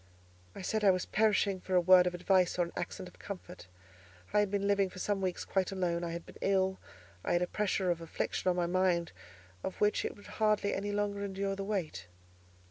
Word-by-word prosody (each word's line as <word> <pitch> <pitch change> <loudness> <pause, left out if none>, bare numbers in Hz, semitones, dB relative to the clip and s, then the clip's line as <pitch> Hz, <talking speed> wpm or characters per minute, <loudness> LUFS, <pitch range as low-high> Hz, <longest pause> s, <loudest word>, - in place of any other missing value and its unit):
I - - -7
said 215 +3 -1
I 200 - +7
was 185 -1 +2
perishing 205 -2 +2
for 185 - -2
a - - +7
word 180 0 +6
of 180 - -1
advice 180 0 +2
or 175 - +2
an 170 - -9
accent 180 +1 -5
of 180 - -16
comfort. 185 - -8 0.7
I - - +5
had 205 -1 +2
been 200 0 -1
living 200 -1 +2
for 185 - -13
some 200 +1 -1
weeks 185 -2 -2
quite 190 0 0
alone; 175 -3 -1
I 170 - -2
had 170 0 -5
been - - -14
ill; 190 -1 +1 0.4
I - - 0
had 175 +1 +3
a - - -1
pressure 190 -2 0
of 170 -1 -2
affliction 165 +2 -2
on 180 - +2
my 175 -1 +1
mind 175 -1 +1 0.5
of 190 - -3
which 210 0 +2
it - - -3
would 205 - -16 0.2
hardly 210 -1 +3
any 205 +1 -2
longer 205 0 -1
endure 195 0 -2
the 195 - -4
weight. 180 - -3
190 Hz, 220 wpm, -32 LUFS, 180-200 Hz, 0.7 s, I